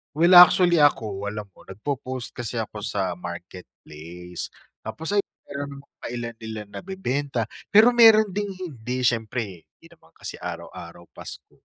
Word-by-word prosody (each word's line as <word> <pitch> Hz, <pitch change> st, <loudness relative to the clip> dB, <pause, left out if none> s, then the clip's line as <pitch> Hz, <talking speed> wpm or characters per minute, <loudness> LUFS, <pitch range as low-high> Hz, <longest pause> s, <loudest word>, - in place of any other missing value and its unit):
Well, 170 Hz, +3 st, +7 dB
actually 175 Hz, 0 st, +8 dB
ako 110 Hz, -9 st, +2 dB
alam 105 Hz, 0 st, -5 dB
mo -, -, -17 dB
nagpo-post 130 Hz, +4 st, -5 dB
kasi 120 Hz, -1 st, -3 dB
ako 105 Hz, -1 st, -6 dB
sa 95 Hz, -3 st, -2 dB
Marketplace. 90 Hz, -1 st, -9 dB, 0.4 s
Tapos, 110 Hz, +9 st, -6 dB
ayun 205 Hz, 0 st, +1 dB, 0.2 s
meron 140 Hz, 0 st, -4 dB
namang 140 Hz, -, -33 dB
pa -, -, -8 dB
ilan-ilan 115 Hz, -3 st, -6 dB
nabebenta, 145 Hz, -, -3 dB, 0.3 s
pero 215 Hz, +4 st, +8 dB
meron 225 Hz, -3 st, +7 dB
ding 200 Hz, +1 st, -3 dB
hindi, 130 Hz, -9 st, -5 dB
syempre 110 Hz, -6 st, -1 dB
hindi -, -, -25 dB
naman -, -, -22 dB
kasi -, -, -8 dB
araw-araw 85 Hz, 0 st, -8 dB
Pasko. -, -, -11 dB
120 Hz, 140 wpm, -24 LUFS, 100-170 Hz, 0.4 s, actually